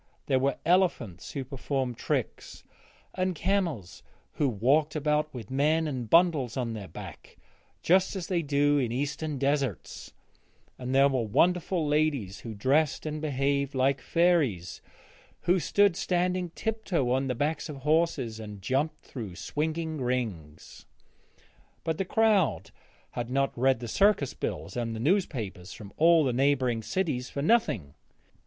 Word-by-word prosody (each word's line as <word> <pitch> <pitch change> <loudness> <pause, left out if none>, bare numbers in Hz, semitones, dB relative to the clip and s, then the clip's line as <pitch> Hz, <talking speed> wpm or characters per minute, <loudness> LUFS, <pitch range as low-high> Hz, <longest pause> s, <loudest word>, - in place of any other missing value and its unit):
There 130 -2 +2
were 135 0 0
elephants 165 - +1
who 135 -3 -4
performed 130 -1 -3
tricks, - - -3 0.5
and 185 -1 -1
camels 165 - -1 0.3
who 145 - 0
walked 140 +8 +2
about 150 0 0
with 120 -3 -9
men 155 +4 +2
and 125 -6 -4
bundles 160 -9 +3
on 120 -3 -2
their 105 -4 -7
backs 80 - -11 0.5
just 185 +3 +3
as 185 -3 -4
they 175 -2 0
do 145 -1 +2
in 120 -4 -1
eastern 145 +3 -3
deserts, 140 -5 -2 0.7
and 130 +1 -3
there 135 +1 +6
were 135 -3 0
wonderful 175 - +2
ladies 145 -10 0
who 115 -2 -7
dressed 140 +10 +1
and 155 0 -4
behaved 140 -1 0
like 130 0 +2
fairies, 145 - +1 0.6
and 180 +1 +3
who - - -5
rode 200 -4 +4
standing 180 0 0
tip 220 0 -3
toe 140 - 0
on 135 +1 +1
the 125 - -1
backs 155 +5 -2
of 150 - -5
horses 150 -7 +1
and 105 -3 -9
jumped 140 +8 -1
through 110 -9 -7
swinging 155 - -3
rings. 105 -12 -4 1.0
But 160 -1 -2
the 195 - 0
crowd 190 - +2 0.4
had 120 0 -4
not 135 +1 0
read 130 0 +2
the 120 - -6
circus 195 - +2
bills - - -5
and 115 -2 -2
the - - -5
newspapers 120 - -1
from 105 -3 -11
all 165 0 +5
the 130 -3 0
neighbouring 130 -3 +1
cities 130 - -2
for 140 - -4
nothing. 120 - +1
140 Hz, 150 wpm, -28 LUFS, 120-165 Hz, 1.0 s, there